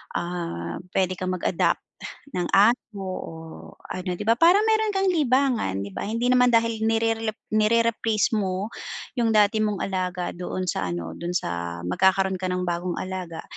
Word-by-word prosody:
ah, 170 - -3 0.2
puwede 185 -1 +1
kang 185 0 -2
mag-adopt 180 -1 +1 0.6
ng 175 -1 0
aso 210 0 +3
o 185 -3 -5 0.6
ano, 185 0 -4
di 175 - -6
ba, 230 - +5
parang 355 +5 +6
meron 440 -1 +2
kang 385 0 +2
libangan, 255 - +1
di 100 - -6
ba, - - -4
hindi 230 +3 0
naman 250 0 +5
dahil 230 -1 +2
nirerelep 225 -1 0 0.2
nire-replace 225 0 +2
mo 195 +1 -2 0.5
yung 230 -1 +2
dati 210 +1 +4
mong 210 -2 -1
alaga 185 -2 -2
doon 180 +1 -4
sa 95 - -2
ano, 85 -1 -4
dun 175 +1 -4
sa 85 - -3
magkakaroon 190 - +2
ka 185 - -2
ng 180 0 -1
bagong 175 +1 -2
alaga, 185 -3 -5
195 Hz, 160 wpm, -25 LUFS, 180-230 Hz, 0.6 s, parang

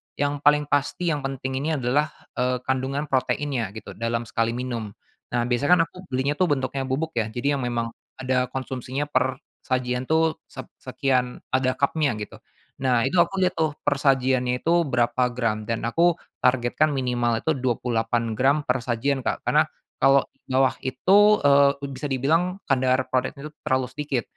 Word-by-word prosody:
yang 145 0 -1
paling 150 0 +5
pasti 145 +5 0
yang 150 - -1
penting 130 -1 -3
ini 155 +3 -1
adalah, 140 +3 +1 0.3
eee, 125 0 0
kandungan 130 +3 -2
proteinnya 130 -4 0
gitu, 110 - -8
dalam 115 +1 -1
sekali 115 0 -1
minum. 120 -4 -4 0.4
Nah, 120 0 0
biasa 120 +1 0
kan 180 - +7
aku 185 - -13
belinya 135 +3 0
tuh 185 - +1
bentuknya 135 -1 -1
bubuk 135 +4 -2
ya, 110 -2 -1
jadi 140 +5 0
yang 135 - -3
memang 120 -1 -1 0.3
ada 130 -1 0
konsumsinya 130 +2 -4
per 130 -2 0 0.2
sajian 125 -1 -1
tuh 160 +3 +2 0.2
sep - - -8
sekian, 125 -2 -1 0.2
ada 130 0 +2
kapnya 140 0 +1
gitu. 105 - -7 0.5
Nah, 125 -3 +3
itu - - -2
aku 195 +3 -5
lihat 185 0 +1
tuh 160 -2 +1 0.2
per 145 - +3
sajiannya 130 -2 +2
itu 170 +1 +2
berapa 125 -2 +1
gram 115 -3 -1
dan 115 +1 -2
aku 170 +6 +2 0.2
targetkan 125 +4 +2
minimal 120 -4 0
itu 160 +6 0
28 115 -2 -1
gram 135 +5 +3
per 125 -1 0
sajian, 130 +2 -1
Kak. - - -3
Karena - - +5 0.3
kalau 135 0 +4 0.2
dibawah 130 0 +2
itu, 200 +11 +4
eee, 140 0 +5
u 140 - -5
bisa 140 +1 -5
dibilang 165 +8 +1
kadar 130 -1 +2
proteinnya 135 +3 -2
itu - - -13
terlalu 130 -1 +1
sedikit. 135 -2 -3
130 Hz, 170 wpm, -24 LUFS, 125-145 Hz, 0.5 s, kan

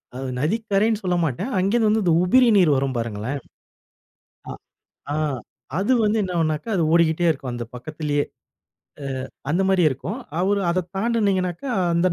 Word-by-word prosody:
அது 130 0 -4
நதிக்கரைன்னு 215 - +1
சொல்லமாட்டேன். 180 - -1
அங்கே 195 +3 +1
இருந்து 225 -3 +3
வந்து 220 +1 +2
இந்த 170 -2 +3
உபரி 250 +8 +5
நீர் 175 -6 +5
வரும் 135 -1 -1
பாருங்களேன். 115 +4 -3 1.1
ஆ. - - -4 0.6
ஆ, - - -1 0.6
அது 205 +7 +1
வந்து 215 +1 +2
என்ன 185 -2 -3
ஆவுனாக்கா, 155 +2 -1
அது 170 - +2
ஓடிக்கிட்டே 170 0 +3
இருக்கும். 135 -5 -3
அந்த 120 0 -4
பக்கத்திலேயே, 145 +2 -2 0.8
அ - - -4 0.4
அந்தமாரியே 185 -1 +3
இருக்கும். 190 - -5 0.2
அவரு 200 +2 +1
அத 180 +1 0
தாண்டுனீங்கனாக்க, 195 -4 0 0.3
அந்த 175 +2 +3
175 Hz, 145 wpm, -23 LUFS, 150-200 Hz, 1.1 s, உபரி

